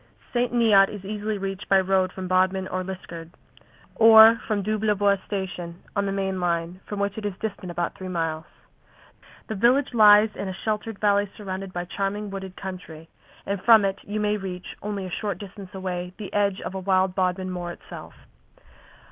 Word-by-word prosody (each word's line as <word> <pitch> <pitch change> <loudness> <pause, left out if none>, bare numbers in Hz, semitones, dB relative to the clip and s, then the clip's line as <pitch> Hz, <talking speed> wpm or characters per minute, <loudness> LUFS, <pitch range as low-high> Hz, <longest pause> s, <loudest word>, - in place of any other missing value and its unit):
St. 245 0 +1
Neot 220 -5 +5
is 200 -2 -8
easily 210 +1 -3
reached 195 0 -5
by 195 - +6
road 190 -1 +1
from 190 -1 -6
Bodmin 185 +1 +1
or 185 0 -2
Liskeard, 175 -3 -8 0.6
or 225 0 +8
from 210 -3 0
Doublebois 205 -2 +1
station, 180 -4 -5
on 200 -1 0
the - - -1
main 190 -1 -2
line, 170 0 -1
from 205 - -5
which 200 +1 -1
it - - -10
is 200 - -5
distant 205 -4 -5
about 170 0 -2
three 190 - -8
miles. 165 -3 -2 1.0
The 220 - -5
village 245 +6 +2
lies 210 -1 +7
in 200 - -4
a 190 - -5
sheltered 215 0 -2
valley 205 -1 +2
surrounded 195 -2 -6
by 175 -1 -4
charming 200 +2 -3
wooded 190 -1 -7
country, 175 -4 -8 0.4
and 200 -1 -3
from 220 -2 +6
it 195 0 -2
you 210 +1 -4
may 210 0 +1
reach, 185 -2 -7
only 205 -2 -4
a 185 - -7
short 205 +1 -3
distance 200 -1 -10
away, 180 -1 -4
the 210 -3 -8
edge 200 -2 +1
of - - -5
wild 190 -1 +3
Bodmin 185 0 -1
Moor 175 -1 -4
itself. 175 - -10
195 Hz, 180 wpm, -25 LUFS, 185-210 Hz, 1.0 s, or